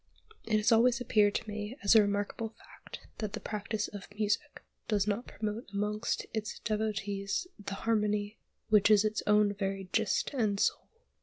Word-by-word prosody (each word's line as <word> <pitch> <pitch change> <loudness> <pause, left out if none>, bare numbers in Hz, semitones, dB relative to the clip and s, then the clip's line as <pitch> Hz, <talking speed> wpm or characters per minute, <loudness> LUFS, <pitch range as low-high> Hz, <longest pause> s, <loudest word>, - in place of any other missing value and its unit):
It 215 -1 +2
has 215 +3 +2
always 235 +2 +5
appeared 210 -4 +3
to - - -2
me 210 +4 -5
as 200 - +5
a 220 - +8
remarkable 205 +2 -1
fact - - -13 0.2
that 215 -2 -3
the - - -3
practice 210 0 -3
of 205 -1 -9
Music 210 +8 -1 0.2
does 205 -3 +2
not 210 +3 -2
promote 215 +2 -4
amongst 210 +2 -1
its 220 -2 -3
devotees 205 - -2
the 200 -1 -5
harmony 210 -1 0 0.3
which 210 -1 +5
is 210 0 +6
its 215 0 0
own 210 -1 +4
very 195 -1 -3
gist 220 -3 +1
and 215 -6 0
soul. - - 0
210 Hz, 165 wpm, -31 LUFS, 205-220 Hz, 0.3 s, a